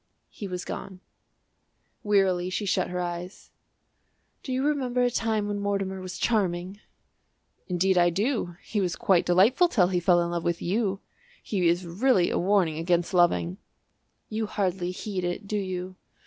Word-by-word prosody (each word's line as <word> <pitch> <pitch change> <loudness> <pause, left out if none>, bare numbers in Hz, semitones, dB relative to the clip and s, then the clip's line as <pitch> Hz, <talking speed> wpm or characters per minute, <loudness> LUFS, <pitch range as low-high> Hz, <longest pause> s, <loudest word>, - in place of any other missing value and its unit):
He 205 - -7
was 180 -1 -5
gone. 190 -2 -7 1.0
Wearily 190 -3 +2
she 185 +3 -2
shut 190 - 0
her 180 0 -3
eyes. 175 +1 -6 0.9
"Do 265 - -6
you 260 +2 0
remember 255 -4 +1
the 245 - +2
time 220 -2 0
when 205 0 -2
Mortimer 195 -2 -2
was 185 -1 -6
charming?" 190 -3 0 0.9
"Indeed 185 0 +2
I 175 0 +5
do; 200 -1 -1
he 210 - -2
was 180 -3 -1
quite 185 -3 +2
delightful 210 - +5
till 190 - +3
he 180 -2 +1
fell 175 0 +4
in 170 0 -2
love 170 -1 -2
with 170 -1 -1
you. 195 +1 -1 0.4
He 185 -5 0
is 175 +2 +1
really 185 +2 +2
a - - 0
warning 180 -4 +2
against 175 +1 0
loving." 175 +1 +2 0.7
"You 220 0 -3
hardly 185 -3 -1
heed 185 0 -4
it, 175 +3 -3
do 210 - -1
you?" 185 -1 -4
185 Hz, 160 wpm, -26 LUFS, 175-205 Hz, 1.0 s, I